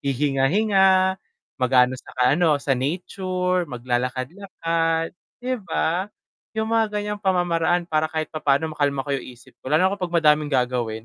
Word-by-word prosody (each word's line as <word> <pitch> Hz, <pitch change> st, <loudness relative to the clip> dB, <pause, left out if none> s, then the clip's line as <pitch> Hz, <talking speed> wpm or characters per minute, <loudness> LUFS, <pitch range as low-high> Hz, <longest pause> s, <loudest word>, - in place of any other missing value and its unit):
hihinga-hinga, 185 Hz, -, +2 dB, 0.4 s
mag-aano 125 Hz, 0 st, +4 dB
sa -, -, -14 dB
ano 155 Hz, +3 st, +4 dB
sa 140 Hz, -, +1 dB
nature, 180 Hz, +4 st, -1 dB
mag-lalakad-lakad, 160 Hz, +7 st, -2 dB, 0.3 s
di 255 Hz, -, -1 dB
ba? 175 Hz, +1 st, -1 dB, 0.5 s
Yung 220 Hz, +1 st, -1 dB
mga 225 Hz, -1 st, +3 dB
ganyang 210 Hz, 0 st, -3 dB
pamamaraan 175 Hz, -2 st, +1 dB
para 155 Hz, -2 st, 0 dB
kahit 155 Hz, -1 st, -3 dB
papaano 155 Hz, +1 st, 0 dB
makalma 145 Hz, -3 st, 0 dB
ko 140 Hz, -, -3 dB
yung -, -, -11 dB
isip 125 Hz, -1 st, -15 dB
ko, -, -, -8 dB
lalo 180 Hz, +6 st, +3 dB
na 200 Hz, -, -4 dB
'pag 180 Hz, -, -1 dB
madaming 150 Hz, -2 st, +4 dB
gagawin 125 Hz, -4 st, -1 dB
160 Hz, 140 wpm, -23 LUFS, 135-185 Hz, 0.5 s, mag-aano